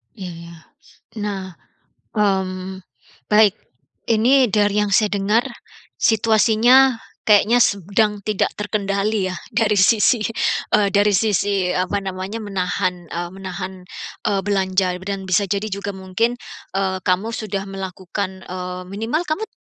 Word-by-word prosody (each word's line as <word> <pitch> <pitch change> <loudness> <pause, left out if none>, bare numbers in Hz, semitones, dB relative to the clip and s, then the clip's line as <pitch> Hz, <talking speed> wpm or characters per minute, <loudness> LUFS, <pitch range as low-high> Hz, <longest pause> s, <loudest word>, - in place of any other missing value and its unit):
Iya. 170 -4 -10 0.5
Nah. 195 -3 -4 0.6
Mmm, 190 -2 -1 0.5
baik. 210 -2 +5 0.6
Ini 245 +3 +4
dari 205 0 +2
yang 205 - -1
saya 210 +1 +3
dengar 210 +5 +1 0.5
situasinya 225 +3 +4 0.2
kayaknya 220 +3 +5
sedang 205 +2 +1
tidak 210 -2 +1
terkendali 200 -1 -1
ya, 185 - -5 0.2
dari 210 -3 +2
sisi 220 +4 +4 0.6
eee, 200 -1 +4
dari 205 +1 +3
sisi 200 -2 +1
apa 185 +2 -1
namanya 190 +3 -5
menahan, 180 -2 -2
eee 175 +2 -5
menahan, 190 0 -7 0.4
eee 200 -2 +1
belanja 190 -2 0
dan 195 -1 -3
bisa 200 +2 +3
jadi 205 +2 -2
juga 200 +1 -4
mungkin, 190 +6 -1 0.4
eee, 190 -1 0
kamu 185 +5 +1
sudah 210 -4 -3
melakukan 190 0 -5
eee, 180 0 -5
minimal 225 - -1
kamu 355 +6 -3
200 Hz, 120 wpm, -20 LUFS, 185-215 Hz, 0.6 s, baik